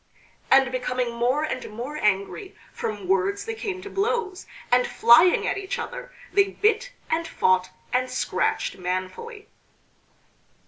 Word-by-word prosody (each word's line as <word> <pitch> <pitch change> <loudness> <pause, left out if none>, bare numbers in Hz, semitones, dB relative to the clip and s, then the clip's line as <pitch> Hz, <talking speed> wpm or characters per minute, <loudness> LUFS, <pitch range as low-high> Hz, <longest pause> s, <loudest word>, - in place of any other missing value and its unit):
And 265 -1 +5
becoming 250 -1 -2
more 245 +5 +1
and 305 -4 -4
more 240 +7 -6
angry, 210 - -1 0.2
from 205 -4 -5
words 195 - +1
they 450 - -3
came 395 -4 -5
to 405 - -7
blows, 405 -2 -1 0.2
and 250 0 +4
flying 240 +10 +5
at - - -1
each 390 -1 -4
other - - -6 0.2
they 395 -1 +5
bit, 440 +5 0 0.2
and 330 +1 0
fought, 185 - +2 0.2
and 255 +1 +1
scratched - - -1
manfully. 185 - -5
270 Hz, 135 wpm, -24 LUFS, -, 0.2 s, And